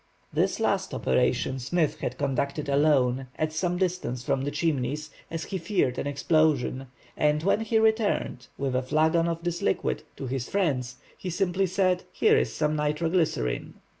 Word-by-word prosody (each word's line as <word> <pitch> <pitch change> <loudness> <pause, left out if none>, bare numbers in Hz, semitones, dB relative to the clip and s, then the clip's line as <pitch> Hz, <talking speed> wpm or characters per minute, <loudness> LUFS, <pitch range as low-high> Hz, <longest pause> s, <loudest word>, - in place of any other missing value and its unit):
This - - +1
last - - 0
operation 65 - +1
Smith 155 +5 0
had 125 - -3
conducted 140 +1 -1
alone, 135 -3 +2
at 155 0 -1
some 175 +2 0
distance 175 -10 -1
from 130 - 0
the 140 - -1
Chimneys, 150 0 -1 0.2
as 165 -1 -4
he 190 - -4
feared 165 -9 0
an - - -2
explosion, 145 -3 +1 0.3
and 150 0 +2
when 200 +3 +3
he 225 0 +1
returned, 220 - +1
with 135 -2 -1
a 130 - +2
flagon 160 +5 +2
of 165 0 -3
this 175 -1 -2
liquid, 95 - 0 0.2
to - - -5
his 130 -1 -3
friends, 140 -11 0 0.2
he 185 - -6
simply 185 +2 +1
said:—"Here 185 - +2
is - - +1
some 150 0 0
nitro 150 +2 0
glycerine!" 150 - 0
155 Hz, 165 wpm, -27 LUFS, 135-175 Hz, 0.3 s, when